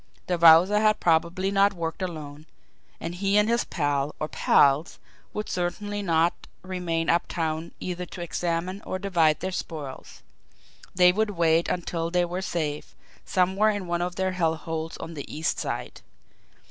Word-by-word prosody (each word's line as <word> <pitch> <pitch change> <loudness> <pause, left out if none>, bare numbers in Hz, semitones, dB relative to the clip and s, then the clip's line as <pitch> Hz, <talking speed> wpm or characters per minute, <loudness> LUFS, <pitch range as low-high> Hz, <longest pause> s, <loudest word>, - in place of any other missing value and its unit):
The 180 -2 -1
Wowzer 170 +5 +7
had 215 0 +3
probably 170 +3 +1
not 200 0 +4
worked 165 -1 -4
alone, 155 -4 -6 0.5
and 165 - -5
he 195 +3 +1
and 210 0 +4
his 235 +1 +2
pal, 145 -3 -1
or 155 - -2
pals, 145 +1 +3 0.3
would 210 - -4
certainly 205 +4 -3
not 170 -2 +1 0.2
remain 175 -3 -2
uptown 165 -1 -1
either 180 0 -4
to 175 - -9
examine 175 +2 -2
or 185 - -4
divide 170 -6 +2
their 190 +2 -2
spoils 150 -7 -7 0.7
they 180 0 +6
would 215 +3 0
wait 170 -3 +2
until 170 -2 -2
they 175 0 +2
were 180 +2 -4
safe 155 -5 -3 0.3
somewhere 190 +3 +2
in 205 -3 -2
one 175 0 -1
of 175 0 -2
their 190 +1 0
hell 165 -3 +1
holes 160 0 -5
on 165 - -7
the 145 -3 -8
East 160 +2 -1
Side. - - -5
175 Hz, 160 wpm, -26 LUFS, 160-190 Hz, 0.7 s, Wowzer